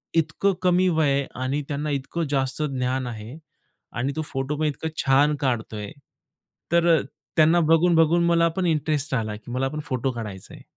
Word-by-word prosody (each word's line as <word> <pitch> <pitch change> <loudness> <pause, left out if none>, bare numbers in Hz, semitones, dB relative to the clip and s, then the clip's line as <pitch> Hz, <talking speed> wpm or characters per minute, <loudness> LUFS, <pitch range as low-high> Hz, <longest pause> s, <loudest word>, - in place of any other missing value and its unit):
इतकं 165 +5 +1
कमी 180 0 +3
वय 160 -4 +2
आहे 140 0 +1 0.2
आणि 140 +3 -1
त्यांना 150 +1 -3
इतकं 140 +5 -2
जास्त 135 +1 -1
ज्ञान 130 -2 -1
आहे 115 +4 -7 0.6
आणि 135 +3 -1
तो 155 - -1
फोटो 135 +2 -3
पण 155 - 0
इतकं 150 +2 -2 0.2
छान 145 +3 +4
काढतोय, 110 -5 -2 0.8
तर 170 0 +4
अ, - - 0 0.4
त्यांना 160 +2 +5
बघून-बघून 165 +1 +4
मला 170 0 +4
पण 185 - +1
इंटरेस्ट 150 -2 0
आला 110 -3 -2
की 115 +3 -11
मला 130 +2 0
पण 150 +1 -5
फोटो 130 0 -1
काढायचा 105 -6 -7
आहे. - - -14
145 Hz, 175 wpm, -24 LUFS, 130-160 Hz, 0.8 s, त्यांना